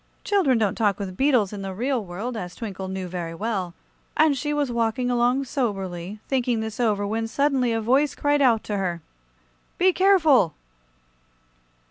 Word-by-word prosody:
Children 355 Hz, -, +2 dB
don't 210 Hz, -4 st, +1 dB
talk 210 Hz, -4 st, +1 dB
with 190 Hz, -3 st, -5 dB
beetles 245 Hz, -6 st, +2 dB
in 200 Hz, -, -6 dB
the 195 Hz, -1 st, -5 dB
real 250 Hz, +2 st, -1 dB
world, 200 Hz, +7 st, -5 dB
as 180 Hz, -5 st, -6 dB
Twinkle 195 Hz, -4 st, -6 dB
knew 190 Hz, -1 st, -4 dB
very 170 Hz, -2 st, -5 dB
well, 190 Hz, -3 st, -3 dB, 0.4 s
and 310 Hz, -2 st, +4 dB
she 295 Hz, +3 st, -2 dB
was 290 Hz, -3 st, 0 dB
walking 235 Hz, +1 st, 0 dB
along 245 Hz, +2 st, +2 dB
soberly, 195 Hz, -7 st, -3 dB
thinking 250 Hz, -3 st, 0 dB
this 220 Hz, 0 st, -5 dB
over, 210 Hz, -4 st, +1 dB
when 225 Hz, +2 st, -2 dB
suddenly 265 Hz, -1 st, +1 dB
a 225 Hz, -, 0 dB
voice 265 Hz, +6 st, +2 dB
cried 290 Hz, 0 st, +1 dB
out 235 Hz, -5 st, +4 dB
to 210 Hz, -, -3 dB
her: 175 Hz, -4 st, -2 dB, 0.7 s
"Be 370 Hz, +1 st, +4 dB
careful!" 320 Hz, -, +4 dB
225 Hz, 165 wpm, -24 LUFS, 195-265 Hz, 0.7 s, and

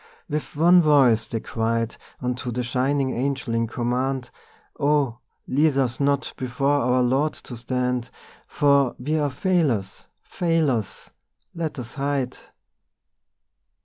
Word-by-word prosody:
With 150 Hz, +1 st, -4 dB
one 175 Hz, +4 st, +6 dB
voice 130 Hz, -8 st, +4 dB
they 115 Hz, -, -3 dB
cried 115 Hz, 0 st, -1 dB, 0.3 s
Unto 125 Hz, 0 st, -2 dB
the 125 Hz, +1 st, -2 dB
shining 130 Hz, +2 st, 0 dB
Angel 130 Hz, -1 st, -2 dB
in 115 Hz, 0 st, +1 dB
command: 125 Hz, +2 st, -2 dB, 0.5 s
'Oh, 140 Hz, -5 st, +1 dB, 0.3 s
lead 145 Hz, +1 st, +2 dB
us 125 Hz, -3 st, 0 dB
not 140 Hz, -1 st, 0 dB
before 135 Hz, +3 st, 0 dB
our 125 Hz, +1 st, +2 dB
Lord 135 Hz, +5 st, +1 dB
to 125 Hz, -, -10 dB
stand, 125 Hz, +1 st, -2 dB, 0.4 s
For 140 Hz, -3 st, +3 dB
we 155 Hz, +5 st, -1 dB
are 145 Hz, -1 st, +1 dB
failures, 130 Hz, -, 0 dB, 0.2 s
failures! 155 Hz, -, -1 dB, 0.4 s
Let 165 Hz, -3 st, -4 dB
us 125 Hz, -1 st, -7 dB
hide. 140 Hz, -3 st, -1 dB
130 Hz, 120 wpm, -24 LUFS, 120-145 Hz, 0.5 s, one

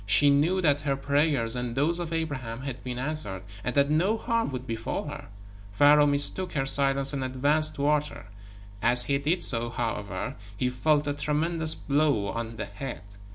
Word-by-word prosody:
She 140 Hz, +9 st, +4 dB
knew 165 Hz, +7 st, +2 dB
that 145 Hz, -4 st, +2 dB
her 140 Hz, -2 st, -1 dB
prayers, 140 Hz, -4 st, +1 dB
and 125 Hz, -1 st, -4 dB
those 160 Hz, +6 st, +1 dB
of 170 Hz, -2 st, -5 dB
Abraham, 130 Hz, -8 st, -4 dB
had 135 Hz, -2 st, -7 dB
been 125 Hz, -1 st, -5 dB
answered, 130 Hz, -9 st, -1 dB, 0.2 s
and 125 Hz, -, -3 dB
that 140 Hz, 0 st, +2 dB
no 185 Hz, +9 st, +1 dB
harm 230 Hz, +1 st, -1 dB
would 130 Hz, -2 st, -6 dB
befall 115 Hz, -2 st, -4 dB
her. -, -, -9 dB, 0.5 s
Pharaoh 145 Hz, +5 st, +5 dB
mistook 145 Hz, +6 st, +2 dB
her 135 Hz, -2 st, -1 dB
silence 135 Hz, 0 st, +3 dB
and 135 Hz, -1 st, -3 dB
advanced 145 Hz, +4 st, +2 dB
toward 150 Hz, +1 st, +1 dB
her. 150 Hz, -, -11 dB, 0.6 s
As 120 Hz, +2 st, +5 dB
he 140 Hz, +2 st, 0 dB
did 160 Hz, +6 st, 0 dB
so, 120 Hz, -1 st, +2 dB
however, 115 Hz, -4 st, -4 dB, 0.2 s
he 125 Hz, -, 0 dB
felt 150 Hz, +4 st, +1 dB
a 145 Hz, -, -1 dB
tremendous 155 Hz, +2 st, +2 dB
blow 140 Hz, -8 st, 0 dB
on 115 Hz, 0 st, -5 dB
the -, -, -5 dB
head. 135 Hz, -9 st, -8 dB
140 Hz, 180 wpm, -26 LUFS, 125-150 Hz, 0.6 s, Pharaoh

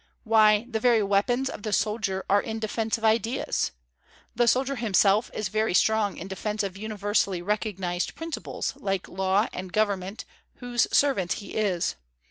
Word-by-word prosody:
Why, 215 Hz, -1 st, +4 dB
the 225 Hz, -3 st, -2 dB
very 230 Hz, -2 st, +4 dB
weapons 205 Hz, +7 st, +1 dB
of 210 Hz, -, -6 dB
the 215 Hz, -, -4 dB
soldier 210 Hz, -3 st, -1 dB
are 200 Hz, +1 st, +4 dB
in 220 Hz, 0 st, -5 dB
defence 220 Hz, 0 st, -1 dB
of 225 Hz, -, -4 dB
ideas! 230 Hz, +3 st, +1 dB, 0.7 s
The 240 Hz, 0 st, +2 dB
soldier 265 Hz, +3 st, +2 dB
himself 210 Hz, -1 st, +3 dB
is 215 Hz, -, -3 dB
very 215 Hz, -2 st, 0 dB
strong 220 Hz, -1 st, +2 dB
in 185 Hz, -, -7 dB
defence 210 Hz, +2 st, -3 dB
of 195 Hz, -2 st, -4 dB
universally 205 Hz, -3 st, -1 dB
recognized 190 Hz, -3 st, -2 dB
principles, 325 Hz, -1 st, -4 dB
like 195 Hz, -2 st, -2 dB
law 190 Hz, +3 st, +1 dB
and 185 Hz, 0 st, -6 dB
government, 200 Hz, -1 st, -1 dB, 0.3 s
whose 245 Hz, -1 st, 0 dB
servant 260 Hz, -11 st, +2 dB
he 205 Hz, -, -8 dB
is. 195 Hz, -, 0 dB
215 Hz, 155 wpm, -26 LUFS, 195-225 Hz, 0.7 s, Why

